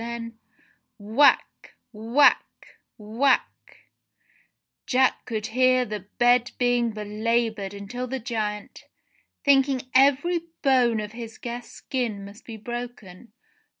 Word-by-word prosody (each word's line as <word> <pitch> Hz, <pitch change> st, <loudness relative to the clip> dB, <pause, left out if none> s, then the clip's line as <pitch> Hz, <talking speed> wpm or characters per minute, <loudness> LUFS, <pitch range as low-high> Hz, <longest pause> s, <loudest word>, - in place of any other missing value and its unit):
Then 230 Hz, -1 st, -7 dB, 0.3 s
— -, -, -41 dB
Whack! 225 Hz, +7 st, +2 dB, 0.2 s
Whack! 230 Hz, +6 st, +1 dB, 0.2 s
Whack! 230 Hz, +5 st, +1 dB, 1.4 s
Jack 260 Hz, 0 st, +2 dB
could 220 Hz, -3 st, -4 dB
hear 255 Hz, 0 st, +3 dB
the 210 Hz, -2 st, -5 dB, 0.2 s
bed 245 Hz, 0 st, +3 dB
being 245 Hz, -1 st, +1 dB
belaboured 215 Hz, -1 st, -2 dB
until 245 Hz, +6 st, -6 dB
the 265 Hz, +2 st, -3 dB
Giant, 215 Hz, -4 st, -5 dB, 0.6 s
thinking 270 Hz, -2 st, +2 dB
every 285 Hz, +6 st, +3 dB, 0.2 s
bone 250 Hz, -5 st, +3 dB
of 210 Hz, 0 st, -5 dB
his 230 Hz, -1 st, -9 dB
guest's 240 Hz, 0 st, -7 dB
skin 230 Hz, -7 st, -4 dB
must 200 Hz, +3 st, -13 dB
be 225 Hz, -2 st, -7 dB
broken. 240 Hz, -3 st, -8 dB
235 Hz, 110 wpm, -25 LUFS, 215-255 Hz, 1.4 s, hear